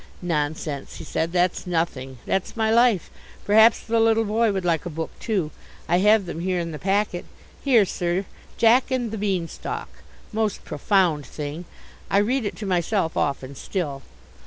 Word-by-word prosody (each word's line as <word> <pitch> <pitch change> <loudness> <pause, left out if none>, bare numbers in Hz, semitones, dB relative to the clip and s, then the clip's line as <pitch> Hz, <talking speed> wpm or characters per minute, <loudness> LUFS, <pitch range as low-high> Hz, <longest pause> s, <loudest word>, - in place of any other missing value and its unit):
"Nonsense," 150 -3 -2
he - - -8
said, 165 +1 -2
"that's 180 +1 +1
nothing. 145 -7 -2
That's 190 +4 -2
my 220 -1 +2
life. 230 -6 +3 0.3
Perhaps 220 +2 +6
the 230 0 0
little 225 0 +4
boy 220 +1 +2
would 190 -2 -2
like 165 -3 +1
a 175 - -4
book 160 0 -4
too. 190 -9 -1 0.4
I 175 - +3
have 210 +1 +5
them 170 -2 -5
here 180 +1 0
in 170 -1 -3
the 150 - -6
packet. 195 -1 0 0.4
Here, 240 -7 +5
sir, 175 +1 -1 0.3
Jack 235 +3 +5
and 250 -4 -1
the 220 - -4
Bean 190 -5 0
Stalk, - - -6 0.4
most 215 -2 -1
profound 180 -7 +1
thing. 150 +3 -6 0.4
I - - +3
read 230 +4 +2
it 205 - -3
to 215 - -6
myself 180 -1 0
often 140 -1 -1
still. 145 -2 -4
185 Hz, 170 wpm, -24 LUFS, 165-220 Hz, 0.4 s, Perhaps